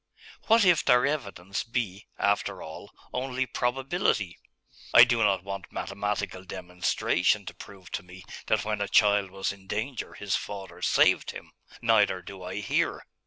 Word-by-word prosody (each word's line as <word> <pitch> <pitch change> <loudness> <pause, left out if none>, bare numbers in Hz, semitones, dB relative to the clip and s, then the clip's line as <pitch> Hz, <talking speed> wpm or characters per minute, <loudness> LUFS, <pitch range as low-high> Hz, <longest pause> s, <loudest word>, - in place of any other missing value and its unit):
What 225 -2 +6
if 175 -3 +5
their 125 +1 +5
evidence 100 -10 -3
be, 115 -4 -3
after 100 0 0
all, 80 0 -10 0.2
only 130 0 -1
probability? 125 - 0 0.6
I - - +12
do 115 -1 +3
not 95 -4 +2
want 100 -1 -6
mathematical 100 -2 -3
demonstration 90 -1 0
to - - -7
prove 95 -2 -13
to - - -3
me 90 +1 -13 0.2
that 110 -1 +1
when 105 -1 -2
a 100 - 0
child 100 -2 +4
was 95 +1 -2
in 95 -1 -14
danger 115 +6 -4
his 100 -2 -1
father 100 -2 -6
saved - - +3
him - - -9 0.3
neither 105 -5 +3
do 95 +1 -10
I 90 +3 -5
here. 100 - 0
100 Hz, 155 wpm, -27 LUFS, 95-120 Hz, 0.6 s, I